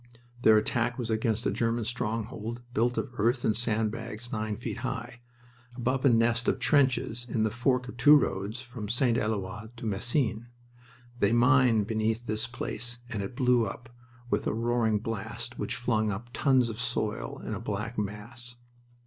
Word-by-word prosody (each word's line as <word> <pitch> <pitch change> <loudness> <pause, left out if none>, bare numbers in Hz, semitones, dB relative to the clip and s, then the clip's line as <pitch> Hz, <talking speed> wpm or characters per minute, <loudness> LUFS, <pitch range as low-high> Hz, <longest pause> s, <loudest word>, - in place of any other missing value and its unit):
Their 110 -2 +7
attack 120 +2 0
was 115 -3 -3
against 110 +1 0
a - - +2
German 115 -1 0
stronghold 115 0 -3
built 120 +2 +1
of 130 - -2
earth 120 +4 +2
and 110 - +2
sand 110 -2 +2
bags 115 +1 -7
nine 110 -1 -2
feet 120 - -5
high, 120 0 -5 0.5
above 130 +1 -1
a 140 - +6
nest 115 0 +3
of - - +2
trenches 130 -4 +2
in 110 -1 +1
the 110 - +1
fork 125 +2 +1
of 125 - -9
two 145 +5 +8
roads 110 -2 0
from 120 -4 -7
St. 120 0 +2
Eloi 105 -1 -2
to 115 - -7
Messines. 115 +2 0 0.7
They 100 +2 +3
mined 120 -3 +4
beneath 110 +2 -1
this 110 +1 -1
place 120 0 -4
and 105 -3 -2
it 110 +6 -6
blew 125 -3 +3
up 115 +4 -8 0.4
with 105 - +1
a - - 0
roaring 115 -1 +1
blast 110 -1 -5
which - - -2
flung 110 -3 +1
up 115 +5 -6
tons 130 -4 +3
of 115 +2 -6
soil 125 +3 -2
in - - -3
a 105 - -3
black 110 +1 -3
mass. 120 +4 -2
115 Hz, 175 wpm, -29 LUFS, 110-120 Hz, 0.7 s, two